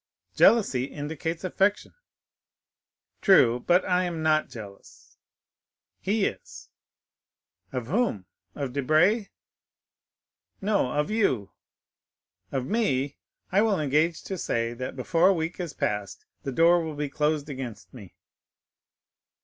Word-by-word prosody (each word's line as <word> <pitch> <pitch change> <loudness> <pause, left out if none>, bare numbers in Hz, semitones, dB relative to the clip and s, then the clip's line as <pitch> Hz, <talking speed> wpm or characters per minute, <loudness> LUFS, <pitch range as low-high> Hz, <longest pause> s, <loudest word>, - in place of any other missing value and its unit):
"Jealousy 165 - +4
indicates 160 +4 -5
affection." 195 +2 0 1.3
"True; 125 - +5
but 175 +8 +2
I 180 0 +2
am 165 -2 -4
not 155 -1 +2
jealous." 100 -4 -12 0.8
"He 205 +1 0
is." - - -6 1.0
"Of 125 -3 -3
whom?—of 140 - -3
Debray?" 160 - +2 1.3
"No, 200 -10 +1
of 150 +8 -1
you." 135 - 0 1.0
"Of 130 -2 -2
me? 140 - 0 0.3
I 195 +3 +4
will 215 -4 +2
engage 155 +3 +1
to 190 -2 -5
say 115 -4 -1
that 130 +2 -6
before 165 +7 +2
a 195 - +5
week 165 +2 -3
is 170 -5 -4
past 105 -2 -3 0.2
the 140 - -4
door 170 +4 +4
will 160 -2 -5
be 145 0 -2
closed 150 +1 -1
against 130 -6 -7
me." 105 -8 -12
155 Hz, 115 wpm, -26 LUFS, 130-185 Hz, 1.3 s, True